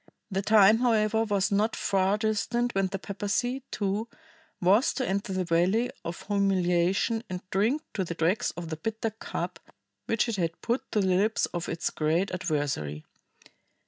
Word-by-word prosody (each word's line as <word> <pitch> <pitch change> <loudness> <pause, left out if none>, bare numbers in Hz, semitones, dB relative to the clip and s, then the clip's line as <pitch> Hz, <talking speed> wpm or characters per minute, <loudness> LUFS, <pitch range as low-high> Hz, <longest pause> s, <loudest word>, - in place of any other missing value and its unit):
The 195 +1 0
time, 215 +1 +6
however, 225 -2 +2
was 205 -1 +1
not 210 +3 +2
far 195 +1 +1
distant 230 +3 0
when 195 -1 +1
the 195 +1 -4
papacy, 205 +7 -2
too, 205 +2 -2 0.5
was 195 +8 +3
to 260 - -1
enter 195 +1 -1
the 185 -1 -1
valley 180 +8 +2
of 170 +1 -6
humiliation 195 +2 +1
and 185 0 -6
drink 225 - +1
to 195 - -1
the 170 -1 -5
dregs 170 +6 +1
the 165 -2 -5
bitter 225 +5 -3
cup 220 - -5 0.5
which 225 +1 +1
it 230 -3 -2
had 165 -2 -2
put 240 +2 -2
to 210 - +3
the - - +1
lips 215 +3 +2
of 175 0 -3
its 165 - -2
great 160 +5 0
adversary. 145 - -2
195 Hz, 160 wpm, -28 LUFS, 180-220 Hz, 0.5 s, time